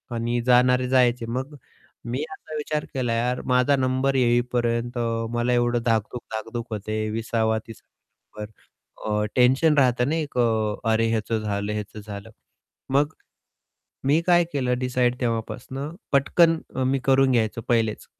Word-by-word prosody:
आणि 120 +1 -1
जाणारे 125 0 +4
जायचे. 125 -2 +3
मग 130 +5 -4 0.5
मी 125 +5 -2
असा 155 0 -9
विचार 150 0 -2
केला 125 -3 -1
यार, 125 +2 0
माझा 125 +2 +3
नंबर 130 +1 0
येईपर्यंत 120 -1 +1 0.4
मला 120 +1 +1
एवढं 120 0 +1
धाकधूक-धाकधूक 115 +1 -3
होत 105 0 -6
आहे, 110 0 -1
20सा 115 +1 -1
वा 110 0 +2
30सा 115 - -12 0.5
वा - - -3
नंबर. 105 - -17 0.7
अ, - - 0
टेन्शन 135 +5 +4
राहत 125 -3 +3
ना 155 - 0
एक 155 -5 -4
अ, 110 -3 +1 0.2
अरे! 115 +1 +2
ह्याचं 110 0 -1
झालं, 100 0 -2
ह्याचं 105 0 -6
झालं. 100 -1 -8 0.7
मग 145 +2 +1 1.0
मी 150 +4 +4
काय 175 -1 +5
केलं 125 -3 0
डिसाईड 125 -1 0
तेव्हापासनं 130 +5 -3 0.2
पटकन 165 +4 +4 0.2
अ, 130 - 0
मी 135 +1 +1
करून 135 -1 +4
घ्याय 115 -3 +3 0.2
पहिलेच. 115 -3 0
125 Hz, 150 wpm, -24 LUFS, 115-130 Hz, 1.0 s, काय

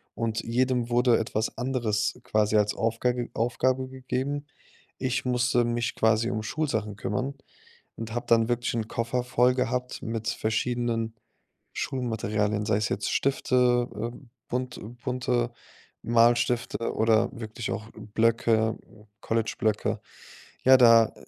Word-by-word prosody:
und 115 -1 -1
jedem 125 0 0
wurde 120 0 +4
etwas 110 0 -2
anderes 120 -5 -1
quasi 110 0 +1
als 105 0 +3
Aufga 115 +2 +1 0.2
Aufgabe 130 +3 0
gegeben. 130 +2 -3 0.5
Ich 130 0 -1
musste 125 -1 +2
mich 120 0 -1
quasi 110 +1 +2
um 110 -2 -2
Schulsachen 110 -7 -2
kümmern 130 +7 -2 0.6
und 115 0 -6
habe 120 +1 -3
dann 115 -1 +4
wirklich 120 0 0
'n 110 -2 -2
Koffer 115 +2 -1
voll 125 0 +3
gehabt 125 0 -2
mit 115 0 -3
verschiedenen 115 0 -1 0.6
Schulmaterialien, 110 -4 -1
sei 105 -2 +2
es 110 - 0
jetzt - - -2
Stifte, 125 -2 +2
äh, 115 +3 -4 0.3
bunt 125 0 -3 0.2
bunte 125 -2 0 0.5
Malstifte 120 0 +2
oder 110 0 +3
wirklich 115 -1 -6
auch 110 - -4
Blöcke, 110 0 +1 0.4
College-Blöcke. 110 -1 -1 0.6
Ja, 130 0 +8
da, 115 -3 +6
115 Hz, 120 wpm, -27 LUFS, 110-125 Hz, 0.6 s, Ja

